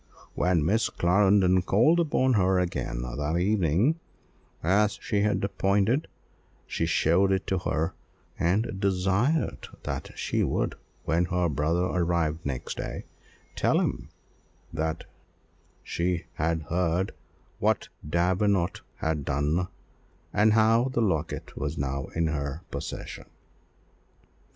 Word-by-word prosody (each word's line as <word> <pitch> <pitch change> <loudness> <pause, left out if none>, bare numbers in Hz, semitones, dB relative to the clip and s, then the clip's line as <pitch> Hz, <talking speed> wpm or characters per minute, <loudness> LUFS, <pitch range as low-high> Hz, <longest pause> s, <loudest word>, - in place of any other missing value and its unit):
When 90 -4 +2
Miss 110 +7 +2
Clarendon 95 0 +3
called 120 - +4
upon 130 -5 +2
her 95 -3 +3
again 85 -9 -2
that 75 +6 -2
evening 100 - +2 0.6
as 105 +5 +3
she 100 - 0
had 105 -1 +1
appointed, 100 +7 +1 0.6
she - - -2
showed 95 +5 +3
it 95 0 0
to 95 - 0
her, 80 -2 -1 0.5
and 95 +3 +1
desired 100 - +1 0.2
that - - -4
she - - 0
would, - - 0 0.3
when 85 +2 +2
her 90 0 +1
brother 80 +5 +1
arrived 85 -3 0
next 70 -3 -4
day, - - -5 0.5
tell - - +2
him - - -2 0.6
what 80 0 -2 0.8
she 85 0 -1
had 80 0 -1
heard, 90 +3 0 0.5
what - - +1
Lady 75 - -10
Davenant 90 +1 +1
had 80 -2 -2
done, 75 +7 0 0.7
and 105 +2 +4
how 115 +2 +4
the 130 -3 0
locket 80 -7 -1
was 75 +1 -3
now 70 -1 -2
in 85 0 +1
her 75 +1 -3
possession. - - -6
90 Hz, 120 wpm, -27 LUFS, 80-100 Hz, 0.8 s, called